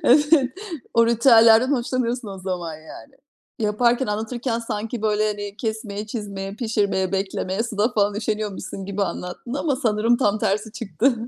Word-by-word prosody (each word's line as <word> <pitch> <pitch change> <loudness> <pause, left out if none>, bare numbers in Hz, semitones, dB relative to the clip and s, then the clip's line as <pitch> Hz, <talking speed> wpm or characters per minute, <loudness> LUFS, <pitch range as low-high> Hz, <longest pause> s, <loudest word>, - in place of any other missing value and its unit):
Evet, 290 0 +5 0.4
o 230 0 +5
ritüellerden 230 +1 +6
hoşlanıyorsun 245 -2 -1
o 195 - -7
zaman, 180 -3 -4
yani. 160 - -12 0.4
Yaparken, 235 +4 +2
anlatırken 230 +3 -2
sanki, 225 0 -4
böyle, 215 0 +2
hani, 205 -1 -5
kesmeye, 220 -2 -4
çizmeye, 200 -3 -5
pişirmeye, 205 -5 0
beklemeye 195 +1 -1
suda 220 -2 0
falan 205 -2 +2
üşeniyormuşsun 210 -2 -3
gibi 200 +1 -2
anlattın 180 +6 -4
ama 285 -1 0
sanırım 230 -2 +2
tam 210 -4 +1
tersi 210 +2 -1
çıktı. 230 - +1
215 Hz, 140 wpm, -23 LUFS, 200-240 Hz, 0.4 s, ritüellerden